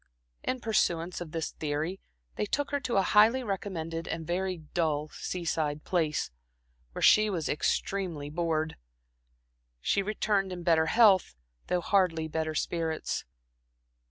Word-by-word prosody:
In 255 -1 -2
pursuance 175 -6 0
of 165 -3 -6
this 165 -1 -3
theory, 155 +5 -3 0.4
they 210 - -1
took 285 +6 -1
her 285 - +1
to 250 -5 -1
a 195 - +4
highly 220 +7 +5
recommended 170 -6 -4
and 165 -1 -4
very 185 +2 -1
dull 155 -2 -1
seaside 160 -5 -2
place, 155 - 0 0.6
where - - -4
she 215 0 +6
was 170 -6 -2
extremely 160 -1 -1
bored. 160 -1 -1 1.0
She 200 - +1
returned 200 -1 0
in 175 -1 -6
better 160 -2 +3
health, 195 - +5 0.3
though 180 -1 +1
hardly 170 -5 +2
better 155 0 -2
spirits. 160 0 -2
175 Hz, 130 wpm, -29 LUFS, 160-195 Hz, 1.0 s, she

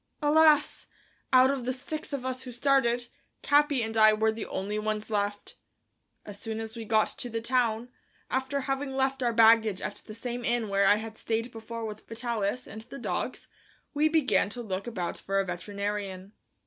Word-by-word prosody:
Alas! 300 0 +4 0.4
out 260 0 +6
of 270 -3 -3
the 255 - -1
six 300 +5 -6
of 275 -3 -3
us 255 0 -2
who 255 -1 -7
started, 245 -1 +2 0.4
Capi 290 -3 +3
and 225 0 -4
I 215 -1 +7
were 220 +1 +2
the 220 0 -6
only 205 +2 -3
ones 215 0 -3
left. 205 0 -2 0.7
As 205 -1 -8
soon 220 -1 -4
as 220 0 -6
we 230 -1 -6
got 215 0 +3
to 245 - -3
the 230 0 -2
town, 235 -1 0 0.4
after 265 +2 -1
having 270 0 -2
left 265 0 0
our 240 -1 +2
baggage 225 -3 +5
at 205 - -4
the 215 - -8
same 240 +1 -5
inn 235 -2 0
where 195 0 +3
I 205 - +7
had 220 +1 -6
stayed 230 +2 -2
before 230 0 -6
with 215 -1 -8
Vitalis 230 0 -2
and 220 +2 -9
the 235 - -10
dogs, 255 - -3 0.5
we 305 +1 +3
began 260 -12 +2
to 240 +3 -6
look 195 0 -4
about 185 -7 -3
for 195 0 -1
a 195 - +1
veterinarian. 200 +1 -4
230 Hz, 185 wpm, -28 LUFS, 215-255 Hz, 0.7 s, I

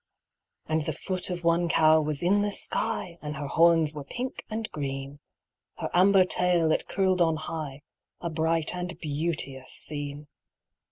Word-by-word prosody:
And 155 0 0
the 155 +1 -2
foot 185 +5 -2
of 175 -1 -4
one 170 +1 +2
cow 155 -1 +5
was 150 0 -2
in 200 +4 +4
the 205 0 0
sky, 175 -3 -3
And 150 -1 -5
her 145 - -4
horns 165 0 +4
were 150 -2 -6
pink 250 - -5
and 220 0 -3
green; 135 -1 -5 0.6
Her - - -4
amber 185 +1 +6
tail 180 -3 +2
it - - 0
curled 190 -2 +1
on 165 -2 +4
high 155 -3 -5 0.4
A 170 - -4
bright 160 0 0
and 180 0 -5
beauteous 145 -3 -2
scene. 145 0 -4
160 Hz, 160 wpm, -27 LUFS, 150-180 Hz, 0.6 s, amber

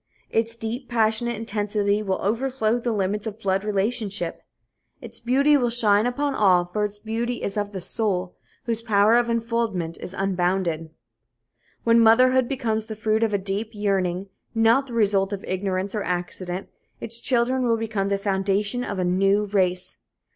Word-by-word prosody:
Its 230 +1 0
deep, 230 +3 -5
passionate 230 0 +1
intensity 210 -1 -1
will 190 -3 -1
overflow 235 +1 0
the 240 0 -1
limits 205 +1 -1
of 215 0 -6
blood 195 -2 0
relationship. 210 0 -2 0.6
Its 235 -3 -8
beauty 270 +5 +3
will 245 -4 +2
shine 220 -2 +3
upon 280 +3 -1
all, 185 -7 +4
for 210 +4 -2
its 205 0 -3
beauty 230 +3 -3
is 195 - -2
of 205 -1 -2
the 195 - -5
soul, 185 -1 -2 0.3
whose 230 -3 -2
power 215 0 +4
of 240 0 +3
enfoldment 230 -7 -1
is 185 - -8
unbounded. 180 -4 0 0.9
When 230 0 +5
motherhood 255 +2 +5
becomes 220 -5 -1
the 220 - -5
fruit 215 +1 0
of 225 -1 +2
a - - +3
deep 200 +3 -2
yearning, 195 -2 -1 0.3
not 230 +5 +4
the 245 - -8
result 200 -3 +2
of 195 - -5
ignorance 190 +1 -2
or 210 - -1
accident, 180 +1 -4 0.3
its 230 +1 -5
children 250 +1 +1
will 230 -1 +2
become 215 -3 -2
the 200 - +1
foundation 200 +4 0
of 200 - -4
a 185 - 0
new 195 +3 +2
race. 185 -3 0
210 Hz, 165 wpm, -24 LUFS, 195-230 Hz, 0.9 s, When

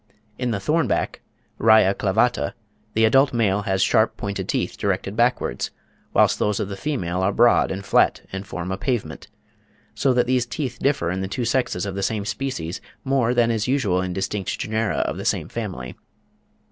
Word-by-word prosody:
In 125 -1 -1
the 110 - 0
thornback 155 +11 0 0.4
(Raia 110 -3 +6
clavata) 105 +5 +1 0.4
the 110 +1 +4
adult 135 +5 +4
male 105 -3 +2
has 95 0 +2
sharp, 110 - +2
pointed 100 -1 -4
teeth, - - -1
directed 100 0 -2
backwards, 120 +2 +1 0.4
whilst - - +3
those 105 -1 +1
of 100 - -2
the 100 - -4
female 95 - -2
are 95 +2 +2
broad 120 +3 +4
and 95 +1 -5
flat, - - +3
and 95 0 -4
form 90 0 -5
a 95 - -3
pavement; 105 -12 -3 0.7
so 135 - +1
that 125 -1 +3
these 125 -1 +1
teeth 135 +1 -4
differ 130 -12 +1
in 95 +1 -2
the 95 - -2
two 120 +5 -3
sexes 120 -6 0
of 100 - -4
the 100 - -3
same 105 0 -1
species 110 -7 -4 0.2
more 130 -3 +1
than 120 -1 +3
is 110 0 -1
usual 110 -9 +1
in 95 0 -3
distinct 95 +1 -2
genera 110 -6 -1
of - - -2
the - - -5
same - - -1
family. 60 0 -5
110 Hz, 185 wpm, -23 LUFS, 95-125 Hz, 0.7 s, Raia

